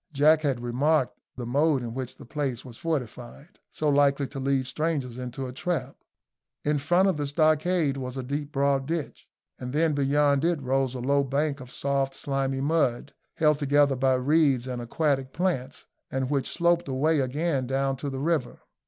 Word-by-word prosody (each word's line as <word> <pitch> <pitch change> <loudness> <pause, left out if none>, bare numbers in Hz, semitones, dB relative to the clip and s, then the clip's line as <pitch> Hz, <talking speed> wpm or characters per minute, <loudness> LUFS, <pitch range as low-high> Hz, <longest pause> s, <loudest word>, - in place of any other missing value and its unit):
Jack 155 +2 +5
had 135 -5 -1
remarked 130 +3 +1 0.2
the 125 - -5
mode 140 +2 +2
in 115 -1 -5
which 130 -1 -5
the - - -12
place 135 -2 -3
was 125 -3 -10
fortified, 135 -1 -5
so 155 - -2
likely 140 -1 +3
to 140 - -6
lead 135 -1 +1
strangers 135 -3 -2
into 125 +1 -5
a 125 - -6
trap. 140 -2 -3 0.7
In 150 0 +2
front 175 +7 +3
of 185 -5 +1
the 145 -1 -2
stockades 155 0 +2
was 130 0 -5
a 130 - -3
deep 145 +3 -4
broad 140 -1 +1
ditch, 165 -2 -4 0.3
and 125 0 -6
then 160 +1 +2
beyond 140 0 +2
it 170 -2 +1
rose 130 -1 0
a - - -4
low 140 +2 +2
bank 140 +2 -1
of 125 -1 -11
soft 135 -1 -1
slimy 135 -1 -1
mud, 145 -5 0 0.2
held 150 -2 +3
together 145 -1 +3
by 130 0 +2
reeds 135 -1 +2
and 125 -2 -4
aquatic 135 +1 -1
plants, 155 -8 -2 0.2
and 130 0 -2
which 140 -2 0
sloped 170 -1 +2
away 145 +4 +1
again 135 0 -1
down 135 +1 0
to 140 +2 -4
the 135 -1 -5
river. 155 -5 -1
140 Hz, 180 wpm, -26 LUFS, 130-150 Hz, 0.7 s, Jack